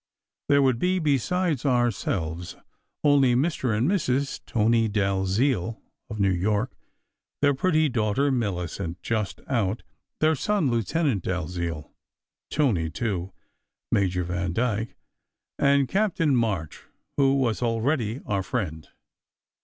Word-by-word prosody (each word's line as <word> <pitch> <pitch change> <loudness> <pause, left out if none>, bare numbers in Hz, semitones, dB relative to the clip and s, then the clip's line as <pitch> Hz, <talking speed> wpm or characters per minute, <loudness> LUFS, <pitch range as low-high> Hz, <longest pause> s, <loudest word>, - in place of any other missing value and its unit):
There 140 0 +5
would 130 -3 +2
be, 185 +4 +1
besides 155 0 0
ourselves, 95 - -1 0.5
only 140 -4 +4
Mr. 130 -5 0
and 120 +5 +2
Mrs. 140 -8 0
Tony 115 -1 +2
Dalziel 100 +3 0 0.3
of 110 -2 -6
New 100 -1 +3
York; 105 +6 0 0.7
their 145 0 +5
pretty 155 +2 +2
daughter, 125 +2 +1
Millicent, 90 -6 -2
just 110 -3 -2
out; 115 -5 -1 0.4
their 155 +1 +4
son, 160 -2 0
Lieutenant 120 - 0
Dalziel 85 -3 -3 0.6
"Tony," 110 - +1
too; 95 0 -3 0.6
Major 90 -2 +1
Vandyke; 95 +6 -1 0.6
and 140 -1 +4
Captain 170 -7 +1
March, 100 -10 -1 0.4
who 135 -1 +4
was 125 -5 0
already 115 +1 0
our 100 -2 0
friend. 90 -7 -3
115 Hz, 110 wpm, -25 LUFS, 95-140 Hz, 0.7 s, There